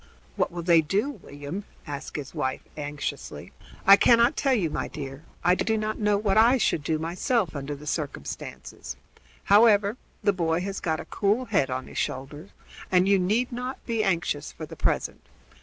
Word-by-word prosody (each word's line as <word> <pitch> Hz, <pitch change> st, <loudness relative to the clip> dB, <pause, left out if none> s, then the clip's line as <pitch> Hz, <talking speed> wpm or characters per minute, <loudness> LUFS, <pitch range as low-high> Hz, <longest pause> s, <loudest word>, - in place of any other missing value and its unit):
"What -, -, 0 dB
will 170 Hz, 0 st, -5 dB
they 170 Hz, -1 st, +5 dB
do, 200 Hz, -, 0 dB
William?" 145 Hz, -, -7 dB, 0.2 s
asked 145 Hz, +1 st, -6 dB
his 145 Hz, -3 st, -5 dB
wife 130 Hz, 0 st, -2 dB
anxiously. 145 Hz, -1 st, -5 dB, 0.3 s
"I 195 Hz, +1 st, +9 dB
cannot 235 Hz, +4 st, +5 dB
tell 270 Hz, -2 st, +2 dB
you, 175 Hz, -9 st, 0 dB
my -, -, -2 dB
dear. 140 Hz, 0 st, -8 dB, 0.2 s
I 180 Hz, -, +5 dB
do 220 Hz, +4 st, +1 dB
not 215 Hz, 0 st, -2 dB
know 210 Hz, -1 st, +2 dB
what 205 Hz, 0 st, +2 dB
I 240 Hz, +4 st, +6 dB
should 165 Hz, -, +1 dB
do 155 Hz, +2 st, 0 dB
myself 175 Hz, +4 st, -1 dB
under 145 Hz, +1 st, -4 dB
the 145 Hz, +1 st, -12 dB
circumstances. 145 Hz, -, -5 dB, 0.5 s
However, 210 Hz, +1 st, +5 dB, 0.3 s
the 205 Hz, -, +3 dB
boy 165 Hz, -2 st, 0 dB
has 195 Hz, +1 st, -4 dB
got 160 Hz, -2 st, -1 dB
a -, -, -7 dB
cool 215 Hz, +5 st, 0 dB
head 200 Hz, -, +1 dB
on 130 Hz, 0 st, -3 dB
his -, -, -6 dB
shoulders, 145 Hz, +5 st, -4 dB, 0.4 s
and 185 Hz, 0 st, +4 dB
you 200 Hz, -1 st, +4 dB
need 215 Hz, +8 st, +1 dB
not 250 Hz, +2 st, -4 dB
be 230 Hz, -2 st, 0 dB
anxious 165 Hz, -6 st, -1 dB
for -, -, -8 dB
the -, -, -10 dB
present. -, -, -1 dB
180 Hz, 180 wpm, -26 LUFS, 150-215 Hz, 0.5 s, I